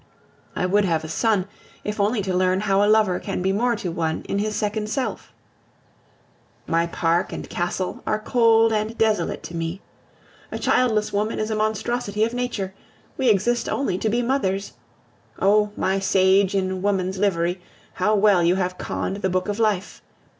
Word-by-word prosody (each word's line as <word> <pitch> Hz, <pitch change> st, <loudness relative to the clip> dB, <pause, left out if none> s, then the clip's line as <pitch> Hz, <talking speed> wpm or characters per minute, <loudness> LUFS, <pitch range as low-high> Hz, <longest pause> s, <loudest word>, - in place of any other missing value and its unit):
I -, -, 0 dB
would 205 Hz, +3 st, +3 dB
have 165 Hz, -4 st, 0 dB
a -, -, -5 dB
son, 200 Hz, +3 st, +1 dB, 0.4 s
if 210 Hz, 0 st, -4 dB
only 205 Hz, +1 st, +1 dB
to 190 Hz, -1 st, -2 dB
learn 185 Hz, +1 st, +2 dB
how 200 Hz, -1 st, +2 dB
a 205 Hz, -, +3 dB
lover 215 Hz, -4 st, +3 dB
can -, -, -4 dB
be 190 Hz, -, +2 dB
more 235 Hz, +4 st, +1 dB
to 185 Hz, -5 st, -4 dB
one 160 Hz, -1 st, -2 dB
in 200 Hz, -, -1 dB
his 215 Hz, +1 st, -1 dB
second 210 Hz, 0 st, -2 dB
self. 260 Hz, +3 st, -3 dB, 1.3 s
My 165 Hz, 0 st, +1 dB
park 170 Hz, +1 st, 0 dB
and -, -, -6 dB
castle 175 Hz, +1 st, -3 dB
are 215 Hz, -, +1 dB
cold 225 Hz, 0 st, +3 dB
and 215 Hz, +2 st, -2 dB
desolate 215 Hz, -6 st, 0 dB
to 170 Hz, -, -8 dB
me. 165 Hz, +2 st, -3 dB, 0.7 s
A -, -, -3 dB
childless 220 Hz, -4 st, +1 dB
woman 210 Hz, +2 st, -1 dB
is 215 Hz, +1 st, -2 dB
a -, -, 0 dB
monstrosity 215 Hz, 0 st, -1 dB
of 230 Hz, +1 st, 0 dB
nature; 240 Hz, -6 st, -3 dB, 0.4 s
we 260 Hz, -3 st, +2 dB
exist 230 Hz, +4 st, +1 dB
only 230 Hz, -10 st, -1 dB
to 220 Hz, -, 0 dB
be 240 Hz, +3 st, 0 dB
mothers. 200 Hz, -7 st, -1 dB, 0.6 s
Oh! 210 Hz, +2 st, +3 dB
my 190 Hz, +1 st, +1 dB
sage 195 Hz, +1 st, +3 dB
in 190 Hz, -1 st, -1 dB
woman's 190 Hz, -1 st, -1 dB
livery, 180 Hz, -2 st, 0 dB, 0.3 s
how 215 Hz, 0 st, +1 dB
well 200 Hz, -3 st, +4 dB
you 170 Hz, +2 st, +3 dB
have 180 Hz, -1 st, -2 dB
conned 195 Hz, -, -3 dB
the 190 Hz, -2 st, -1 dB
book 185 Hz, 0 st, -1 dB
of 205 Hz, +1 st, -3 dB
life! 210 Hz, -3 st, 0 dB
200 Hz, 175 wpm, -23 LUFS, 185-215 Hz, 1.3 s, well